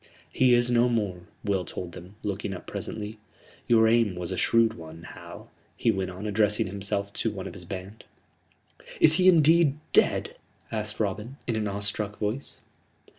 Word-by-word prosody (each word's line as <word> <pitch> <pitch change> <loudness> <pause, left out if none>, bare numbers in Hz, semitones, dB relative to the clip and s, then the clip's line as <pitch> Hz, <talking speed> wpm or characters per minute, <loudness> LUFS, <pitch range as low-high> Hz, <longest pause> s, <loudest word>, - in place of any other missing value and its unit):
"He 125 -1 +5
is 120 0 +2
no 120 +1 +4
more," 100 -7 -2 0.2
Will 100 -3 0
told 90 0 -6
them, 90 +4 -11
looking 100 -1 -3
up - - -10
presently; 105 0 -5 0.5
"your 110 -1 +5
aim 115 -4 +3
was 90 +1 -4
a - - -1
shrewd 115 +3 +3
one, 80 -2 -11
Hal," - - -11 0.3
he - - +3
went 95 -1 -2
on, 95 +3 -7
addressing 105 0 +2
himself 100 +1 -3
to - - -1
one - - -6
of - - -6
his - - -10
band. 95 +3 -8 0.9
"Is 155 - +7
he 185 - +7
indeed 160 -3 +5 0.2
dead?" - - +2 0.3
asked 105 -1 -4
Robin, 110 +5 -2
in 115 - -1
an 110 -1 -1
awestruck 100 +1 -3
voice. 110 +7 -4
105 Hz, 170 wpm, -27 LUFS, 95-115 Hz, 0.9 s, Is